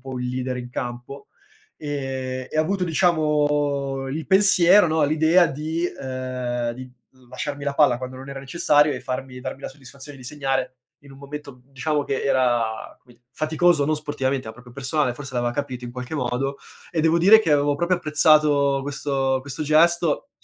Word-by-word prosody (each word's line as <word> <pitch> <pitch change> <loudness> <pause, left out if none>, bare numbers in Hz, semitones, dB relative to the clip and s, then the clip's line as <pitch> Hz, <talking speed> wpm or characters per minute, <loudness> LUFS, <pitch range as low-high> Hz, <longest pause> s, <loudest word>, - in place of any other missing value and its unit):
po' 130 0 -7
il 125 0 -3
leader 125 0 -3
in 125 0 -7
campo, 125 +3 -7 0.5
ehm, 130 -3 -4
e - - -5
ha - - +4
avuto 185 +4 -1
diciamo 150 -5 +1
il 155 +4 -4
pensiero, 190 -1 +5
no, 155 -1 +2
l'idea 160 +4 +4
di 160 +4 -3
ehm, 125 -4 -4
di 130 +1 -10 0.4
lasciarmi 140 +3 -5
la 140 0 -2
palla 140 -5 +4
quando 130 0 -7
non 135 +1 -10
era 135 0 -6
necessario 145 +1 +2
e 125 - -6
farmi 130 0 -5
darmi 130 +1 -6
la - - -4
soddisfazione 140 +1 -12
di 125 - -13
segnare 135 -1 -2 0.3
in 140 - -15
un 135 - -14
momento, 140 0 -8
mhmm, 125 +2 -26
diciamo 145 +2 -1
che 135 - -2
era 120 -4 0
come 120 -1 -22
faticoso, 155 +1 +2
non 155 - +1
sportivamente, 135 -3 -2
ma 110 - -6
proprio 125 0 -15
personale, 135 0 -1
forse 135 0 -9
l'aveva 120 0 0
capito 130 -3 -4
in 120 - -7
qualche 125 +3 -6
modo. 135 +2 -2 0.3
E 165 - -1
devo 165 +1 +3
dire 200 +6 +7
che 160 -8 +1
avevo 145 0 +2
proprio 175 +3 +1
apprezzato 150 -3 +3
questo 135 -2 -1
questo 140 +2 -6
gesto, 165 - +2
140 Hz, 180 wpm, -23 LUFS, 130-155 Hz, 0.5 s, dire